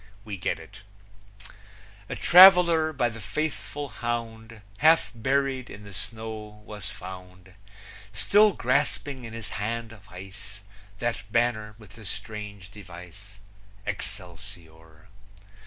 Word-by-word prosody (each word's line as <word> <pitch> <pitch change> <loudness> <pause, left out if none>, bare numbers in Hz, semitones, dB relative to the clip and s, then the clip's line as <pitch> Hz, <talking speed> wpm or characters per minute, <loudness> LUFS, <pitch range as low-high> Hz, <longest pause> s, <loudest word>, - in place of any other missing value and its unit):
We 105 -2 -4
get 95 - -1
it: 80 +5 -13 1.3
A - - -3
traveler, 175 -3 +8
by 125 -5 +1
the 115 0 -9
faithful 145 +4 -3
hound, 115 -3 -5 0.2
Half 160 +1 +5
buried 130 +2 0
in 105 - -10
the 100 -1 -11
snow 110 +1 -6
was 105 -3 -6
found, 90 0 -10 0.6
Still 205 - +4
grasping 130 0 0
in 115 - -8
his 115 -3 -6
hand 115 +3 -3
of 100 -3 -15
ice 100 +2 -10 0.4
That 115 -2 -3
banner 110 -3 +1
with 105 -4 -15
the 110 0 -13
strange 100 -1 -6
device, 95 +1 -12 0.5
Excelsior! 85 -5 -8
105 Hz, 115 wpm, -27 LUFS, 95-120 Hz, 1.3 s, traveler